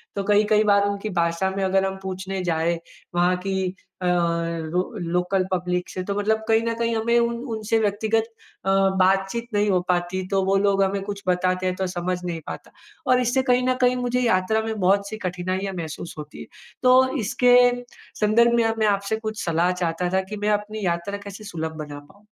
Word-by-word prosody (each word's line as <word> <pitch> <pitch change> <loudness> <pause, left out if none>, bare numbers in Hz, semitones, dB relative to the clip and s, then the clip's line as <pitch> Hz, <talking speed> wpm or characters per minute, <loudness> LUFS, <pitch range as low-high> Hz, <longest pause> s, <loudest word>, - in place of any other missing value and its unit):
तो 200 - -1
कई, 205 +1 +4
कई 215 0 +3
बार 200 -1 +4
उनकी 200 +1 -3
भाषा 170 +3 0
में 195 - 0
अगर 190 0 +2
हम 190 0 -3
पूछने 190 0 -4
जाएँ, 170 0 0 0.4
वहाँ 175 +1 +3
की 190 -1 -1 0.3
अ, - - -2
लो 170 -1 0 0.3
लोकल 180 +1 +1
पब्लिक 180 0 -1
से 185 - -4
तो 200 +1 -3
मतलब 220 +1 +1
कहीं 225 0 +4
न 230 0 -1
कहीं 230 0 0
हमें 235 +2 +2
उन 235 0 0 0.2
उनसे 220 +1 0
व्यक्तिगत 220 +1 +1 0.4
अ, - - +1 0.3
बातचीत 195 +5 +2
नहीं 205 0 +2
हो 185 - +3
पाती, 180 +1 0
तो 195 0 +1
वो 195 - +2
लोग 195 0 +3
हमें 195 0 0
कुछ 200 0 -6
बताते 185 0 +1
हैं 185 - -1
तो 190 0 -2
समझ 180 0 -2
नहीं 170 -2 -3
पाता। - - -8 0.4
और 255 0 +5
इससे 250 +2 +2
कहीं 250 +1 +3
न 255 - +3
कहीं 250 0 +4
मुझे 250 0 0
यात्रा 220 -2 +2
में 220 -1 -3
बहुत 200 +2 +2
सी 220 - -5
कठिनाइयाँ 185 +2 -3
महसूस 160 0 -6
होती 150 0 -9
है। - - -8 0.4
तो 260 +2 +5
इसके 245 +4 +4 0.7
संदर्भ 235 +3 +4
में 235 - +3
अब 225 0 0
मैं 215 - +3
आपसे 200 +2 -3
कुछ 220 -1 -5
सलाह 170 +2 +2
चाहता 180 0 -1
था, 190 - +3
कि 205 +3 -7
मैं 205 +1 -1
अपनी 210 0 -1
यात्रा 170 +3 -1
कैसे 200 +1 -9
सुलभ 160 -4 -5
बना 145 -1 -8
पाऊँ? 195 +9 -21
195 Hz, 205 wpm, -23 LUFS, 180-215 Hz, 0.7 s, और